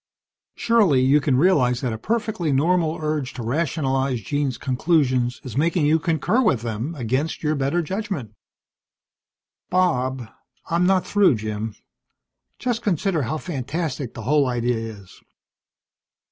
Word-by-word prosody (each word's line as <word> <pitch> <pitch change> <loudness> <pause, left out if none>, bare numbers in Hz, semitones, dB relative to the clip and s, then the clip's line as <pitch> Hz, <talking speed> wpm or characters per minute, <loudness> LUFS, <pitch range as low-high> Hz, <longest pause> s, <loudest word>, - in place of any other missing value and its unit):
Surely 210 - +3
you 140 +3 +4
can 140 -3 +2
realize 130 -7 +3
that 125 -4 -1
a - - -4
perfectly 215 - -1
normal 165 +3 +2
urge 150 -4 -2
to 120 - -6
rationalize 135 -1 0
Jean's 140 +3 -2
conclusions 130 -3 +1
is 125 -4 -7
making 160 +2 +2
you 155 +2 +3
concur 165 - +1
with 130 - +1
them 120 +8 -3
against 130 +6 -2
your 155 0 +1
better 140 +4 0
judgment." 185 - -4 1.4
"Bob 130 -9 +1 0.2
" - - -26
"I'm 175 +2 +3
not 190 -1 +2
through, 200 -9 +4
Jim. 110 0 -4 0.8
Just 240 -2 -2
consider 190 -4 0
how 130 +5 -2
fantastic 145 -3 -4
the 115 - -7
whole 145 +3 +3
idea 120 -1 0
is. 110 -4 -9
145 Hz, 135 wpm, -23 LUFS, 125-170 Hz, 1.4 s, you